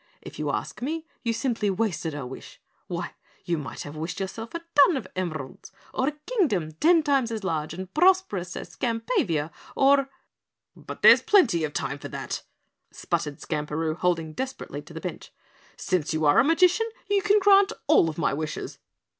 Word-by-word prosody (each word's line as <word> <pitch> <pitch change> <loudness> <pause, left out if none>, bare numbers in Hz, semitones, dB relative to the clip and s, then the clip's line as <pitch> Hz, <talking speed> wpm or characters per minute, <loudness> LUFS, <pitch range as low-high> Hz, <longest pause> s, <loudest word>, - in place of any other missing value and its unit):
"If - - -11
you - - -1
ask - - -4
me, 315 +5 -3 0.2
you 230 - 0
simply 230 -2 -1
wasted 180 -6 -1
a 145 -3 -5
wish. 130 +1 -10 0.3
Why, - - -4 0.3
you 175 - 0
might 145 - -6
have 145 +1 -9
wished 160 +5 -4
yourself 225 - -5
a 335 - -3
ton 290 +2 +6
of 220 - -5
emeralds 155 -7 -5 0.2
or 260 - 0
a 300 - 0
Kingdom 275 - 0
ten 320 - +4
times 275 -5 +2
as 220 -2 -4
large 160 -4 -2
and 190 +1 -8
prosperous 330 - +2
as - - -6
Skampavia 225 - -1 0.2
or 275 0 +4 0.4
" - - -62 0.3
"But - - -10
there's - - +9
plenty 250 - +4
of 150 - -6
time 140 - -3
for - - -7
that," - - -5 0.5
sputtered 145 -1 -3
Skamperoo, 155 +1 -2
holding 165 -3 0
desperately 265 +8 -5
to - - -14
the - - -6
bench, - - -6 0.5
"since 165 -4 -1
you 155 0 0
are 145 - +5
a - - +6
magician 360 - +3 0.2
you 405 -1 +2
can 415 +1 +4
grant 395 0 +5
all 165 - +5
of 155 - -7
my 165 - +1
wishes." 155 +1 -5
200 Hz, 180 wpm, -26 LUFS, -, 0.5 s, there's